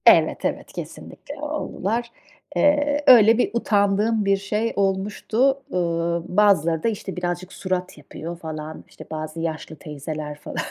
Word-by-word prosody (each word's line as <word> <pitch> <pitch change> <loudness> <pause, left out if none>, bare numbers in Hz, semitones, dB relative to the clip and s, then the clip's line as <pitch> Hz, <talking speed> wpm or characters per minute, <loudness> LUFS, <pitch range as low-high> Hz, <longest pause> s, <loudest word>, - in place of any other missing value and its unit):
Evet, - - +5
evet, - - -3
kesinlikle 285 - -8
oldular. 235 -6 -2 0.4
Eee, 290 0 +3
öyle 225 -3 +8
bir 245 - +2
utandığım 210 -1 +2
bir 195 0 +3
şey 210 +3 -1
olmuştu. 210 +7 +1
Eee, - - -1 0.6
bazıları 170 -6 +4
da - - +2
işte, 200 -3 -5
birazcık 180 +1 -3
surat 185 -2 -3
yapıyor 165 +3 -8
falan. 155 -1 -7
İşte, - - -12
bazı 155 +1 -5
yaşlı 160 -1 -4
teyzeler 150 0 -6
falan. - - -8
195 Hz, 135 wpm, -23 LUFS, 160-230 Hz, 0.6 s, öyle